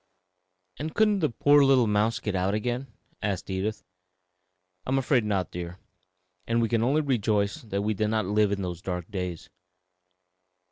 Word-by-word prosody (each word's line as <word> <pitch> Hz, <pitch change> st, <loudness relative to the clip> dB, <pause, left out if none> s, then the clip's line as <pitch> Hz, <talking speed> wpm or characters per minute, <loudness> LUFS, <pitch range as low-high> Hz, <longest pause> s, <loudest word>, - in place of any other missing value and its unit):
"And 155 Hz, +2 st, -4 dB
couldn't 210 Hz, -2 st, +3 dB
the 155 Hz, -4 st, +2 dB
poor 145 Hz, +5 st, +5 dB
little 135 Hz, -3 st, +5 dB
mouse 105 Hz, +2 st, +1 dB
get 105 Hz, -, -3 dB
out 95 Hz, +2 st, 0 dB
again?" 120 Hz, +4 st, -2 dB, 0.3 s
asked 100 Hz, -2 st, -2 dB
Edith. 100 Hz, +3 st, -2 dB, 1.0 s
"I -, -, -3 dB
am 135 Hz, -, +2 dB
afraid 130 Hz, -2 st, +2 dB
not, 100 Hz, -3 st, -1 dB
dear; 90 Hz, +1 st, -6 dB, 0.7 s
and 115 Hz, 0 st, +1 dB
we 115 Hz, -1 st, +1 dB
can 115 Hz, -2 st, +1 dB
only 140 Hz, +6 st, +2 dB
rejoice 105 Hz, -7 st, 0 dB
that 100 Hz, -3 st, -3 dB
we 110 Hz, +1 st, +1 dB
did 105 Hz, +1 st, 0 dB
not 110 Hz, -1 st, 0 dB
live 105 Hz, +1 st, +2 dB
in 100 Hz, -1 st, -1 dB
those 90 Hz, -2 st, -5 dB
dark 90 Hz, -1 st, -5 dB
days. 90 Hz, -4 st, -5 dB
105 Hz, 170 wpm, -27 LUFS, 95-125 Hz, 1.0 s, poor